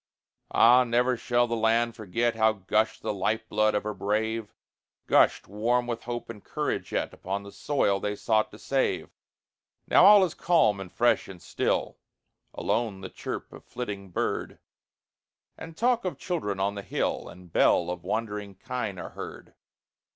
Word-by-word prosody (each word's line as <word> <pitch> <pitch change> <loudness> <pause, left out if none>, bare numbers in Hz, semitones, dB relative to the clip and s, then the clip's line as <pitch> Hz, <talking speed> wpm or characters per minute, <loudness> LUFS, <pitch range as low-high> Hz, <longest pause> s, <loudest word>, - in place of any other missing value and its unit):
Ah! 125 +2 +6
never 125 +1 +2
shall 120 0 +1
the 115 -1 -2
land 115 +1 +2
forget 115 +2 -1
How 110 0 +3
gushed 105 +2 0
the - - -1
life 110 +3 -1
blood 110 0 +2
of 105 - 0
her 105 0 -3
brave 110 +2 -1 0.5
Gushed, - - +3
warm 120 +5 0
with 120 -1 -4
hope 120 0 -4
and 110 -3 -9
courage - - -3
yet, - - -1
Upon 100 +2 -4
the 100 - -10
soil 100 -9 0
they 105 +1 -2
sought 110 0 +1
to 105 - -13
save. 135 +4 -1 0.8
Now - - +6
all 205 -1 +9
is 180 - 0
calm, 160 - +3
and 95 -2 -8
fresh, 120 0 +2
and 95 -2 -10
still; - - -1 0.6
Alone 110 -4 -1
the - - -6
chirp - - -6
of - - -12
flitting 100 -5 -6
bird, 90 - -2 1.0
And 160 0 -10
talk 240 +1 +2
of 185 - -3
children 105 - -3
on 100 +1 0
the 100 - -5
hill, - - -2
And 90 -2 -14
bell 85 0 +3
of 90 -1 -6
wandering 105 0 -3
kine 115 -2 -4
are - - -6
heard. - - -9
110 Hz, 165 wpm, -27 LUFS, 100-120 Hz, 1.0 s, all